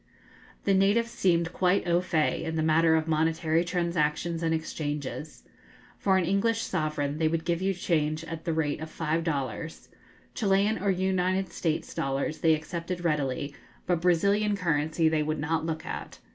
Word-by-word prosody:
The 200 - +2
natives 205 +5 +3
seemed 175 -6 +1
quite 180 0 +2
au 175 +1 +3
fait 160 -4 0
in 160 0 -3
the 160 - 0
matter 160 +1 +4
of 160 0 0
monetary 160 +1 +1
transactions 170 -2 -1
and 165 -1 0
exchanges. 150 -2 -4 0.6
For 190 -1 +3
an 185 - +1
English 225 +5 +1
sovereign 155 -4 -2
they 160 - +3
would 160 0 -1
give 170 0 0
you 195 +1 +2
change 155 -3 0
at 165 -1 -7
the 170 - -1
rate 155 -2 -1
of 160 - -5
five 160 +1 -1
dollars. 145 -1 -4 0.4
Chilian 205 +1 +2
or 200 - +1
United 185 0 0
States' 160 -2 -2
dollars 135 +3 -2
they 160 -1 +4
accepted 170 +2 -5
readily, 145 -2 -1 0.3
but 175 -2 +1
Brazilian 200 +4 +2
currency 160 -2 +1
they 160 -1 +2
would 155 +1 -1
not 160 +2 -1
look 160 -1 -3
at. - - -6
165 Hz, 165 wpm, -28 LUFS, 155-180 Hz, 0.6 s, matter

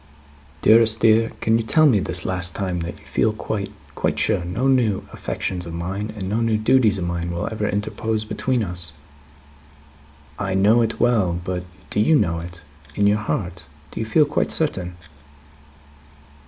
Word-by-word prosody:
"Dearest 110 0 +5
dear! 115 0 +4
Can 115 +1 +2
you - - -1
tell 155 +8 +4
me, 125 -9 +5
this 85 -2 0
last 90 -1 0
time, 95 -3 -2
that 85 +1 -5
you - - -20
feel 110 - +1
quite, 105 -2 -4 0.2
quite - - -1
sure, 90 - +1
no 95 +10 -1
new 120 -7 +1
affections 90 -2 -4
of 85 - -6
mine, 95 +5 -4
and 95 -2 -4
no 110 +4 0
new 115 -1 +2
duties 110 -1 +3
of 95 - -3
mine, 85 0 -3
will 85 0 -3
ever 105 -1 -2
interpose 110 +2 -2
between 125 +2 -1
us? 90 -2 -4 1.5
I 100 -2 -1
know 105 +5 +4
it 115 -1 -1
well, 105 -8 +2
but 90 -1 -4 0.3
do - - 0
you 155 +10 +4
know 85 - +1
it? 85 +1 -10 0.3
In 100 - +2
your 105 +1 +3
own 105 - -7
heart, 90 - -3 0.3
do - - -6
you 110 - -3
feel 150 +7 +4
quite 145 - -1
certain?" 90 - -1
105 Hz, 180 wpm, -22 LUFS, 90-115 Hz, 1.5 s, Dearest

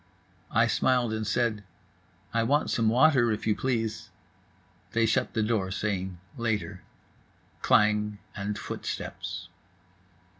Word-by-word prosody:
I - - +4
smiled 125 -3 +2
and 110 -1 -2
said: 110 -1 0 0.7
"I 115 - +2
want 140 +6 +2
some 115 -2 +2
water, 125 -1 +5
if 105 - -3
you 110 -1 +2
please." 115 -4 -2 0.8
They 115 0 +3
shut 110 - 0
the 110 - +2
door, 105 -4 0
saying 95 -2 -2 0.2
"Later." 105 -4 -2 0.8
Klang 105 0 +3 0.2
and 105 0 -3
footsteps. 90 -3 -5
110 Hz, 115 wpm, -28 LUFS, 105-115 Hz, 0.8 s, water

